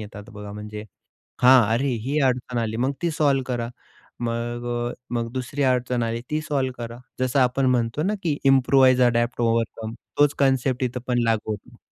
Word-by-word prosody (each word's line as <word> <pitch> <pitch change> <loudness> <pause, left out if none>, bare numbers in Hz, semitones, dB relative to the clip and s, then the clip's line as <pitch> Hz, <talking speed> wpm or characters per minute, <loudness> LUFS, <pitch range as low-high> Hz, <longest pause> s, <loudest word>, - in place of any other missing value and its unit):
येतात. 105 +1 -10
बघा 105 -1 -8
म्हणजे 105 0 -7 0.6
हां, 125 0 +8
अरे 135 +4 +1 0.2
ही 145 +4 0
अडचण 125 -1 -2
आली, 110 -1 -1
मग 130 +3 +1
ती 170 - 0
सॉल्व्ह 140 -3 +2
करा. 120 -2 -2 0.5
मग 120 0 -3 0.3
अ, - - -8 0.2
मग 115 -1 -2
दुसरी 130 +3 -2
अडचण 125 -2 +1
आली, 115 +1 -2
ती 155 - 0
सॉल्व्ह 135 -4 -1
करा. 115 +1 -9 0.2
जसं 130 +2 +1
आपण 130 +1 +2
म्हणतो 120 +5 -1
ना, 205 - +1
की 155 -4 0
इम्प्रूवाइज 130 -1 +5
अडॅप्ट 120 0 +2
ओव्हरकम 115 -1 -1 0.3
तोच 145 -1 +5
कन्सेप्ट 130 -2 +2
इथे 125 0 -2
पण 120 -1 +1
लागू 110 -1 0
होतो. 100 -1 -8
125 Hz, 175 wpm, -24 LUFS, 115-135 Hz, 0.6 s, हां